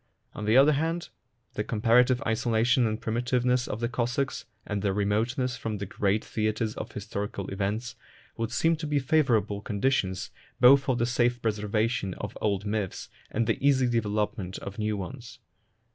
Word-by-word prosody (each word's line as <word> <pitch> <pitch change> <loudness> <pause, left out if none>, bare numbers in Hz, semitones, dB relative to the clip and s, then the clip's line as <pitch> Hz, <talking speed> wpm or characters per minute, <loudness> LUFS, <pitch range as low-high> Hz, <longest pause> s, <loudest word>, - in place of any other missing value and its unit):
On 105 - -6
the 110 +4 +4
other 140 +3 +7
hand, 165 +4 -1 0.4
the - - -2
comparative 120 +3 +3
isolation 115 +2 +2
and 110 0 -2
primitive 120 +2 -1
ness 125 0 +2
of 110 - -4
the 120 - +1
Cossacks, 125 +1 -2 0.2
and 105 -1 -2
their 100 -2 0
remoteness 120 +6 0
from 110 -2 -3
the 100 - -4
great 100 +2 0
theatres 110 0 -1
of - - -7
historical 100 -1 -4
events, 105 +4 -3 0.4
would 115 0 -3
seem 165 +8 +2
to 155 0 -4
be 145 0 +1
favourable 120 -8 +2
conditions 100 -3 -1 0.3
both 135 +2 +8
for 135 -2 0
the 120 - +1
safe 120 0 +1
preservation 105 -2 -1
of 105 0 -6
old 100 -1 0
myths 105 -2 -3 0.2
and 115 +1 0
the 115 +3 -1
easy 135 -2 +4
development 105 -4 -1
of 100 +1 -8
new 105 -1 0
ones. 125 +5 -8
115 Hz, 165 wpm, -27 LUFS, 105-125 Hz, 0.4 s, both